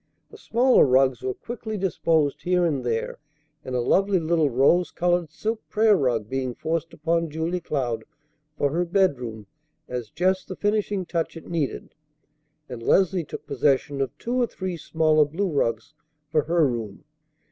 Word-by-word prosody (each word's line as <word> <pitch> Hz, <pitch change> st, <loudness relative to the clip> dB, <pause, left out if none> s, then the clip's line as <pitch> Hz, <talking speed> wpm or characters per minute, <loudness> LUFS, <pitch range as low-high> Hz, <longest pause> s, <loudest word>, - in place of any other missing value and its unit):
The 440 Hz, -, -12 dB
smaller 250 Hz, -, +4 dB
rugs 130 Hz, -1 st, +3 dB
were 130 Hz, -, -3 dB
quickly 225 Hz, -2 st, -6 dB
disposed 165 Hz, -5 st, +1 dB
here 180 Hz, 0 st, +2 dB
and 145 Hz, -6 st, 0 dB
there, 115 Hz, -2 st, -2 dB, 0.4 s
a -, -, -8 dB
lovely 185 Hz, +11 st, +2 dB
little 160 Hz, -2 st, +2 dB
rose 140 Hz, +8 st, +3 dB
colored 175 Hz, -2 st, 0 dB
silk 220 Hz, +8 st, -3 dB
prayer 215 Hz, -1 st, +4 dB
rug 120 Hz, -, 0 dB
being 130 Hz, -1 st, -3 dB
forced 165 Hz, +1 st, -2 dB
upon 165 Hz, +1 st, -1 dB
Julia 165 Hz, +4 st, -2 dB
Cloud 120 Hz, -8 st, -2 dB, 0.5 s
for 145 Hz, -, +1 dB
her 170 Hz, +4 st, +1 dB
bedroom 130 Hz, -, 0 dB, 0.4 s
as 125 Hz, -3 st, -5 dB
just 185 Hz, -, 0 dB
the 185 Hz, -, -6 dB
finishing 205 Hz, -2 st, 0 dB
touch 170 Hz, -1 st, -2 dB
it 165 Hz, -, -11 dB
needed, 160 Hz, -5 st, -3 dB, 0.7 s
and 125 Hz, -3 st, -7 dB
Leslie 185 Hz, +7 st, +3 dB
took -, -, -8 dB
possession 140 Hz, +1 st, +1 dB
of 135 Hz, -3 st, -3 dB
two 250 Hz, +2 st, -1 dB
or 240 Hz, -, +2 dB
three 185 Hz, -4 st, -5 dB
smaller 155 Hz, -1 st, +2 dB
blue 170 Hz, +6 st, -2 dB
rugs 115 Hz, -3 st, -1 dB, 0.4 s
for 155 Hz, -, +2 dB
her 165 Hz, -2 st, +3 dB
room. 115 Hz, -5 st, -5 dB
160 Hz, 160 wpm, -24 LUFS, 130-185 Hz, 0.7 s, smaller